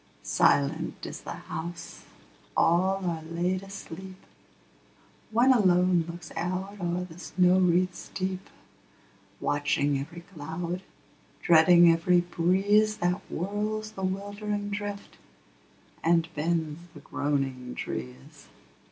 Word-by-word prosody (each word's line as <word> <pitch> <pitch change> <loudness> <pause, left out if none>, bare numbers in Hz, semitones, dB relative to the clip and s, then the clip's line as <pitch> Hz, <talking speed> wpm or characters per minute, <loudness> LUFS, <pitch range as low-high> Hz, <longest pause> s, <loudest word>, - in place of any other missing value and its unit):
Silent 155 +4 +1
is - - -7
the - - -7
house: 170 +1 -7 0.5
all 190 +3 +3
are 165 -2 -1
laid 175 +3 -1
asleep: 190 -1 -9 1.1
One 240 +4 +5
alone 180 -5 +4
looks 170 0 -8
out 185 +4 -3
o'er 175 +1 -1
the 175 -1 -11
snow 180 +1 +3
wreaths 180 0 +1
deep, 190 0 -3 0.9
Watching 145 -1 +1
every 160 +5 -7
cloud, 170 +1 -5 0.6
dreading 170 +1 +7
every 175 +2 +3
breeze 195 +5 +2
That 180 +2 0
whirls 210 +4 -2
the 195 - -8
wildering 205 +2 -3
drift, 205 0 -5 0.8
and 165 0 +3
bends 160 0 -1 0.2
the - - -9
groaning 135 -3 -2
trees. 65 0 -7
175 Hz, 105 wpm, -28 LUFS, 165-190 Hz, 1.1 s, dreading